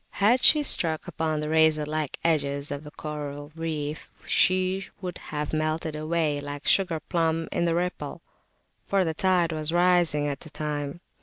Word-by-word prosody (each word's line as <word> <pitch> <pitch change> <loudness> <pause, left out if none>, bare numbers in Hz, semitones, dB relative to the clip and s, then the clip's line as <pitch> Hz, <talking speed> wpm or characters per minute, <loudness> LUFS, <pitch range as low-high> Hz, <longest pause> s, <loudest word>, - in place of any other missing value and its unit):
Had 225 +6 +4
she 300 -1 +7
struck 160 - +4
upon 155 -1 -2
the 150 - -3
razor 160 -1 +4
like 155 -2 -3
edges 140 -3 0
of 145 +1 -5
the 150 - -9
coral 145 -1 -7
reef, 155 -2 -4
she 185 +1 +2
would 180 -2 -6
have 150 0 -4
melted 155 0 -1
[p.220] 150 - -5
away 155 -3 0
like 145 0 -7
a - - +3
sugar 180 -5 +2
plum 165 -1 -1
in 170 - 0
the 165 -1 +1
ripple, 180 +1 -3 0.6
for 195 -2 +2
the 160 - -1
tide 180 0 +2
was 155 0 -2
rising 175 -4 +3
at 140 -1 -3
the 155 - -11
time. 150 +1 -4
160 Hz, 175 wpm, -26 LUFS, 150-175 Hz, 0.6 s, she